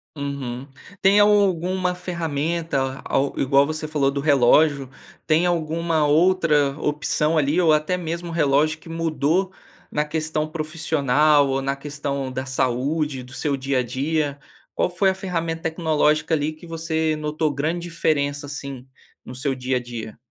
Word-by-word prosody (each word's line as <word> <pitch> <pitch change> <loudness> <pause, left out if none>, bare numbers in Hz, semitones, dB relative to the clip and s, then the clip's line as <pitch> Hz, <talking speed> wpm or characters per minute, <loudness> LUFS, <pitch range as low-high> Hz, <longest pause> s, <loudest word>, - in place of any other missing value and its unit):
Uhum. 140 -3 -5 0.3
Tem 200 +2 +5
alguma 185 -3 +2
ferramenta 160 -5 -2
a - - -3 0.2
igual 140 +1 +4
você 155 +1 -4
falou 140 -3 +1
do 140 - -3
relógio, 140 0 +4 0.4
tem 160 +2 +3
alguma 165 -2 0
outra 150 -3 +3
opção 150 +1 0
ali, 150 +5 +2
ou 165 - +4
até 155 +4 +2
mesmo 170 0 -4
relógio 155 -1 +2
que - - -14
mudou, 165 +3 0 0.4
na 150 - 0
questão 155 0 -2
profissional 155 -2 +2
ou 135 0 0
na 135 +1 -1
questão 140 -2 -4
da 130 +1 -4
saúde 130 +2 -1
do 125 - -13
seu 145 0 -1
dia 135 -1 -1
a - - +1
dia? 145 +4 -1 0.4
Qual - - +1
foi 190 +2 +2
a - - -5
ferramenta 165 -3 -3
tecnológica 160 -1 +1
ali 150 0 +1
que 155 +2 -14
você 160 -1 -1
notou 150 +1 -1
grande 155 +5 -1
diferença, 145 -3 -1
assim, 140 -2 -7 0.4
no - - -8
seu 140 +1 -1
dia 130 0 -1
a - - -1
dia? 120 -3 -8
155 Hz, 150 wpm, -22 LUFS, 140-165 Hz, 0.4 s, Tem